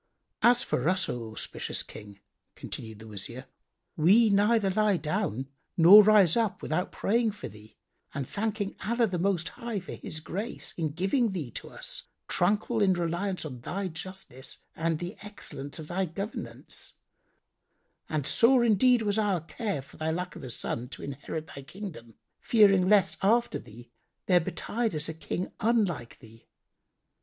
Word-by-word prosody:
"As 240 +2 +5
for 130 +7 0
us, 185 0 +2
O 115 -2 -4
auspicious 110 - -3
King" 100 -1 -12 0.3
continued 110 -2 -7
the 110 +1 -12
Wazir, 110 +4 -8 0.5
"we 205 +8 +5
neither 205 0 +3
lie 210 -1 +3
down 155 - -2 0.3
nor 185 +5 +10
rise 205 -5 +6
up 225 -4 0
without 180 +4 -1
praying 225 0 +1
for 205 - -7
thee 105 +1 -15 0.3
and 135 -2 -4
thanking 210 -1 -2
Allah 235 +4 +2
the 185 -5 -2
Most 180 -2 +1
High 235 -3 -4
for 185 - -9
His 155 - -5
grace 195 +7 -5
in 155 -4 -2
giving 195 - +1
thee 150 -10 -4
to - - -7
us, - - -8 0.2
tranquil 210 +5 +1
in 195 -2 +5
reliance 175 +2 -2
on 130 -5 -7
thy 190 +8 -3
justice 165 -6 -7
and 165 0 0
the 175 +5 -6
excellence 195 -9 -7
of 155 -2 -8
thy 185 +3 0
governance; 195 +5 -7 1.2
and 155 -4 -1
sore 240 - +5
indeed 235 +2 +4
was 205 0 +1
our 200 -5 +1
care 195 - -3
for 135 - -16
thy 155 0 -1
lack 180 +3 -3
of - - -9
a 130 - -6
son 120 +1 -1
to - - -9
inherit 145 +3 -5
thy 140 - -10
kingdom, 140 - -9 0.2
fearing 195 -5 +5
lest 205 -3 +4
after 230 +5 +2
thee 120 +1 -14 0.3
there 180 -2 +5
betide 220 +4 -2
us 150 0 +1
a 160 - -4
King 175 +3 -4
unlike 210 - 0
thee. 115 -2 -17
185 Hz, 160 wpm, -28 LUFS, 150-210 Hz, 1.2 s, nor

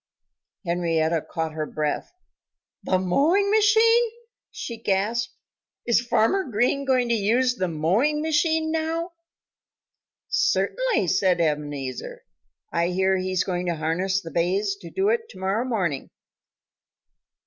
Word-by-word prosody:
Henrietta 170 -2 +1
Hen 155 - -7
caught 160 -1 -2
her 155 -1 -3
breath. 150 -1 -3 0.7
"The 185 - +1
mowing 305 - +2
machine!" 450 +2 +4 0.4
she 235 - -6
gasped. 215 +4 -1 0.5
"Is 235 -1 +3
Farmer 240 - +2
Green 250 +3 0
going 255 -2 +2
to - - +3
use 235 +4 +2
the 185 -6 -2
mowing 190 - +1
machine 315 0 +1
now?" 325 +2 -2 1.2
"Certainly!" - - +1
said 185 0 +2
Ebenezer. 145 -5 -3 0.5
"I 170 0 +1
hear 190 +1 +1
he's 185 0 0
going 180 -1 -3
to 170 - 0
harness 175 +5 0
the 165 -3 -9
bays 195 +4 0
to 295 - -1
it 455 0 0
to - - -13
morrow 195 +6 0
morning." 185 - -2
200 Hz, 125 wpm, -24 LUFS, -, 1.2 s, machine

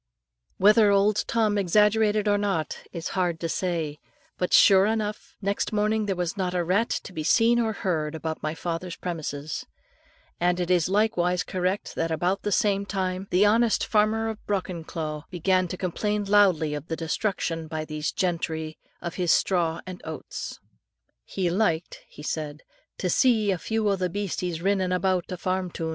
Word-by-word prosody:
Whether 210 +2 +6
old 200 +1 +3
Tom 215 -3 +1
exaggerated 210 +2 +3
or 205 0 +3
not 180 -7 -1
is 165 -2 -5
hard 175 -3 -1
to 165 - -1
say; 165 -4 -2 0.4
but 180 - -2
sure 195 0 +7
enough, 215 -1 -3
next 200 +3 -1
morning 215 0 +1
there 195 - 0
was 175 0 -2
not 185 -2 -2
a 175 - +1
rat 195 +7 +1
to - - -10
be 155 - -4
seen 235 +7 +4
or 225 -2 +1
heard 160 -7 -2
about 160 0 -4
my 155 +1 -2
father's 170 +1 -4
premises; 155 -4 -4 0.8
and 180 +1 +2
it 180 0 -1
is 175 -1 +3
likewise 185 -4 +2
correct 185 +2 -2
that 165 - -1
about 175 +4 0
the 205 - -2
same 200 -2 +2
time, 190 -1 -3
the 185 +3 +4
honest 225 +2 +3
farmer 220 +1 +2
of 220 -1 -5
Brockenclough, 165 -5 -3
began 185 +1 +1
to 180 - -5
complain 205 +4 -1
loudly 190 -7 +4
of 150 +1 -5
the 165 - -2
destruction 165 -1 -2
by 155 0 -4
these 155 0 -3
gentry 160 -3 -2 0.2
of 170 -1 -3
his 175 - +3
straw 170 -4 +2
and 185 -1 -8
oats. 160 -1 -6 0.7
"He 180 -3 -1
liked," 175 -4 0
he 150 - -12
said, 150 -1 -4 0.3
"to 185 - -2
see 215 +1 +3
a 185 - -1
few 220 +2 -1
o' 200 - +3
the 180 -1 -1
beasties 180 -3 -3
rinnin' 190 -2 +1
aboot 185 0 0
a 180 - -3
farm 185 +1 -1
toon. 165 -1 -4
185 Hz, 175 wpm, -26 LUFS, 165-205 Hz, 0.8 s, sure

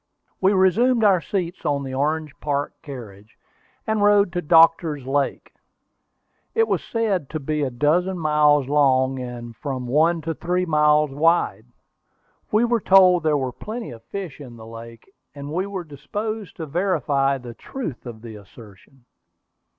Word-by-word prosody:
We 190 +2 +4
resumed 225 +6 +3
our 195 -4 +4
seats 180 -2 -4
on 140 -1 -1
the 130 -1 -6
Orange 150 +2 -1
Park 145 -1 -2
carriage, 110 -8 -11 0.5
and 220 -1 0
rode 205 -2 +4
to 175 - -1
Doctor's 165 -3 +4
Lake. 140 +1 -2 1.0
It 455 0 +3
was - - -1
said 205 - -1
to 155 - -4
be 150 +1 -2
a 140 - 0
dozen 160 +9 +1
miles 150 -3 +3
long, 135 -2 +2
and 120 -2 -7
from 130 -2 -5
one 160 +6 +2
to 165 +1 -3
three 180 +2 -1
miles 150 -2 +3
wide. 145 - +1 0.8
We 215 +3 +3
were 235 -2 +1
told 185 -2 +6
there 155 -1 +2
were 130 -2 -2
plenty 225 - -7
of 115 -2 -11
fish 185 -5 -7
in 120 -4 -11
this 110 - -11
lake, 115 0 -11 0.3
and 145 +1 -7
we 185 +4 -1
were 195 -3 -5
disposed 205 +8 -6
to 160 - -6
verify 145 -5 0
the 125 -2 -10
truth 155 - -7
of 115 -2 -9
the 110 -2 -9
assertion. 105 +5 -17
150 Hz, 160 wpm, -22 LUFS, 130-180 Hz, 1.0 s, told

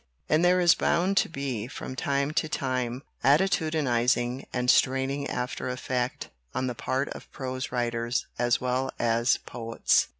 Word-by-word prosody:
And 155 +2 +3
there 180 +1 +5
is 175 -1 +6
bound 185 +4 +1
to - - +3
be, 135 -8 -3
from 130 -1 -7
time 140 +2 0
to 155 0 0
time, 130 -3 -2 0.2
attitudinizing 135 -5 +2
and 125 -1 -1
straining 135 +2 +1
after 125 +1 -3
effect 125 0 -2 0.3
on 130 +1 0
the 125 - -2
part 130 +4 -2
of - - -9
prose 130 -1 -4
writers 120 0 -1
as 120 -1 +2
well 130 +1 -1
as 115 +1 +3
poets. 115 -1 +1
130 Hz, 145 wpm, -27 LUFS, 120-140 Hz, 0.3 s, is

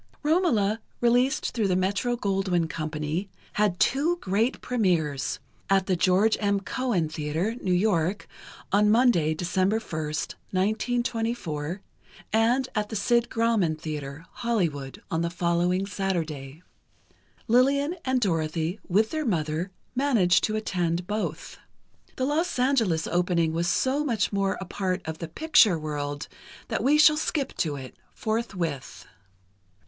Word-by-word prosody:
"Romola," 235 - +2 0.2
released 245 +4 +2
through 220 -4 0
the 185 - +1
Metro 200 +6 0
Goldwyn 190 -5 0
Company, 155 +4 -3 0.2
had 205 -4 +1
two 310 +6 +2
great 220 - 0
premières: 170 - 0 0.3
at 195 -1 +3
the 190 - +1
George 190 +5 +3
M. 200 -1 +1
Cohan 205 -4 -1
Theatre, 155 +6 -2
New 185 - -1
York, 180 0 +1 0.4
on 210 +1 +4
Monday, 210 -10 +4
December 185 +5 +1
1st, 155 -6 -4 0.2
1924, 215 -5 -1 0.5
and 240 +4 +3
at 210 -1 -1
the - - -5
Sid 235 +3 +2
Grauman 225 -8 +1
Theatre, 150 0 -6
Hollywood, 170 - -2
on 165 - 0
the 170 - 0
following 175 +2 +1
Saturday. 165 -7 -3 0.8
Lillian 275 +6 +3
and 260 -1 +1
Dorothy, 165 -2 -1
with 215 +5 +2
their 310 -1 -1
mother, 165 - -1 0.2
managed 245 -10 +3
to 215 - -2
attend 175 -5 -1
both. 180 -6 -4 0.6
The 255 - -1
Los 310 +4 0
Angeles 230 -11 +2
opening 175 -2 +1
was 170 +1 0
so 265 +10 +1
much 230 -8 0
more 195 -1 0
a 190 - -5
part 185 0 -2
of 160 0 -5
the 165 - -4
"picture" 215 - +4
world 145 -1 -4 0.4
that - - -1
we 290 +3 +4
shall 305 0 +6
skip 300 -3 -1
to 150 -4 0
it, 130 -2 -9 0.2
forthwith. 185 - -3
195 Hz, 135 wpm, -26 LUFS, 165-235 Hz, 0.8 s, shall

